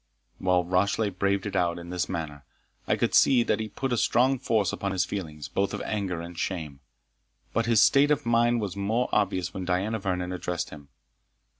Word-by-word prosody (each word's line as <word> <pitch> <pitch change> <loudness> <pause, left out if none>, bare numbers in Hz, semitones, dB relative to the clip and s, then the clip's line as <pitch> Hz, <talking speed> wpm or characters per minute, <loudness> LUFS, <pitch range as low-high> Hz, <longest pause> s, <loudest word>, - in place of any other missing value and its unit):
While 90 -1 +2
Rashleigh 100 +4 +1
braved 100 +1 0
it 105 - -4
out 85 -1 +1
in 85 0 -8
this 90 -1 -2
manner, 75 -4 -5 0.4
I - - +3
could - - 0
see 125 -3 +5
that - - 0
he 110 0 -3
put 135 +4 -3
a - - +1
strong 130 +4 +2
force 110 -7 +1
upon 100 -1 -2
his 90 -1 +1
feelings, 80 -7 -6
both 100 +1 -1
of 105 - -5
anger 95 -5 -2
and 85 +1 -8
shame. 80 -6 -4 0.7
But 115 0 0
his 115 -3 +5
state 140 +1 +5
of 150 -1 +1
mind 120 0 +3
was 100 -3 -4
more 110 +5 0
obvious 95 -4 0
when 95 - -4
Diana 95 +5 -1
Vernon 90 -2 -2
addressed 90 -1 -3
him. 70 -2 -12
95 Hz, 195 wpm, -27 LUFS, 90-110 Hz, 0.7 s, see